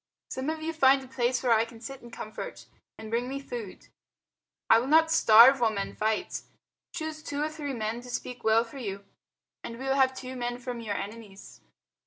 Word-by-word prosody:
"Some 260 +3 -3
of 315 0 -4
you 325 +1 -2
find 270 -3 +4
a - - -12
place 250 -1 0
where 245 -2 +4
I 220 0 +4
can 230 0 -11
sit 265 +3 -8
in 240 - -12
comfort; 220 -1 -8 0.3
and 220 0 -9
bring 240 +2 -1
me 275 +1 -4
food. 240 -7 -8 0.8
I 225 - +7
will 245 - -3
not 320 +2 +5
starve 245 -1 +8
while 235 -2 +3
men 200 -2 -4
fight. 215 0 -1 0.5
Choose 315 -2 -5
two 290 -1 -3
or 305 - -1
three 295 -3 -5
men 225 +1 -3
to 250 - -12
speak 245 0 -5
well 220 +1 +4
for 235 +4 -11
you, 200 -4 -5 0.6
and 230 - -7
we 265 - -7
will 270 - +2
have 265 -1 +3
two 260 0 -7
men 245 -1 -3
from 245 -1 -6
your 210 -3 -3
enemies." 205 -2 -8
245 Hz, 210 wpm, -28 LUFS, 225-270 Hz, 0.8 s, starve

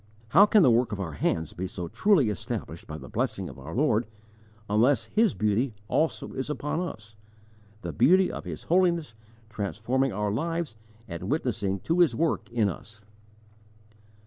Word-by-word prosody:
"_ - - -33 0.3
How 195 - +7
can 210 -2 +5
the 130 - +6
work 120 +1 +2
of 105 - -4
our 90 -4 -3
hands 80 +2 -1
be 95 +2 -4
truly 110 - +1
established 95 0 -5
by 75 - -6
the 65 -4 -10
blessing - - -2
of - - -11
our 75 +5 -8
Lord, 125 -5 +2 0.6
unless 115 +7 +3
His 220 -2 +1
beauty 110 +3 0
also 160 +8 0
is 130 +2 -4
upon 150 +1 -2
us 110 -12 -6 0.7
the - - -4
beauty 180 +10 +4
of - - -6
His - - -7
holiness 170 -6 +2 0.4
transforming 115 +6 -1
our 105 0 -1
lives 165 +1 -2 0.3
and 85 -2 -6
witnessing 100 -1 -1
to 165 +2 0
His 160 -10 +4
work 165 +5 0
in 115 -3 +2
us? 105 +3 -7
115 Hz, 165 wpm, -27 LUFS, 100-160 Hz, 0.7 s, How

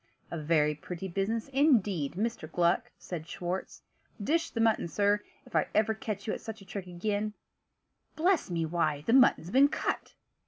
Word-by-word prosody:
"A 170 - -3
very 150 -1 +2
pretty 170 +5 -6
business, 200 +6 -1
indeed, 215 - +2
Mr. 205 -4 -3
Gluck!" 170 0 +2
said 165 -3 -6
Schwartz. 180 +2 -4 0.4
"Dish 325 +11 +1
the 230 - -5
mutton, 225 -5 +3
sir. 205 +5 +2 0.2
If - - -12 0.2
ever 220 +1 +3
I - - -11
catch 215 -2 -5
you 215 - -1
at - - -5
such 220 0 -7
a 195 - -14
trick 190 -1 -6
again 205 +4 -2 0.8
bless 350 - +2
me, 165 -2 0
why, 160 -3 0
the 230 - +2
mutton's 250 -9 +5
been 270 +3 +6
cut!" - - -3
200 Hz, 170 wpm, -30 LUFS, 170-225 Hz, 0.8 s, been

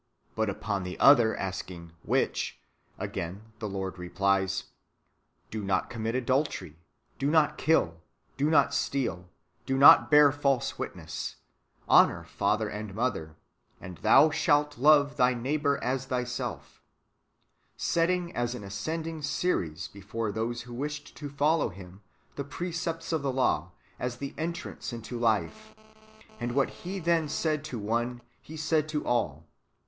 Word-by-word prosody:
"^ - - -35
But 110 -1 0
upon 100 0 -2
the 90 0 -6
other 120 -6 +6
asking 90 -3 -5
" - - -24
AVhich? - - 0 0.2
" - - -39
again 100 +6 -5
the 105 -2 -4
Lord 95 -1 -4
replies: 95 +2 0 0.4
" - - -43
Do 110 -1 -4
not 95 -1 0
commit 115 0 -2
adultery, 130 - -1 0.4
do 140 - +1
not 155 -1 +3
kill, 85 - +2 0.3
do 145 +3 +1
not 155 - +4
steal, 95 -10 -1 0.4
do 135 - +1
not 145 +4 +8
bear 150 -2 +7
false 140 -3 0
witness, - - -5 0.5
honour - - +5
father 110 +1 0
and 105 -1 -6
mother, 105 -10 -2 0.4
and 90 -2 -9
thou 155 - +6
shalt 145 -2 +2
love 145 0 +5
thy 125 0 +4
neighbour 140 +3 0
as 130 +1 -1
thyself," 125 -1 -4 0.5
— - - -46 0.2
setting 175 +1 0
as 120 0 -1
an 105 - -7
ascending 160 - -4
series 90 - -1
{velut - - -24
gracilis) - - -27
before 105 +2 -4
those 115 +3 -2
who 120 0 -10
wished 145 +3 -5
to 145 -2 -6
follow 145 +2 +2
Him, 95 +1 -12 0.4
the 140 - -2
precepts 165 +2 -4
of 160 - +1
the 140 -1 -1
law, 130 0 +1 0.3
as 125 -1 -3
the 140 +1 -5
entrance 170 -2 -5
into 120 +1 -6
life; 120 - -1 0.6
and 120 0 -2
what 135 +1 +2
He 185 +2 -6
then 170 -3 +1
said 155 -1 -1
to 130 -5 -5
one 120 +3 -2 0.3
Pie 160 - -8
said 155 0 0
to 150 -1 -2
all. 80 - -1
125 Hz, 155 wpm, -28 LUFS, 105-150 Hz, 0.6 s, not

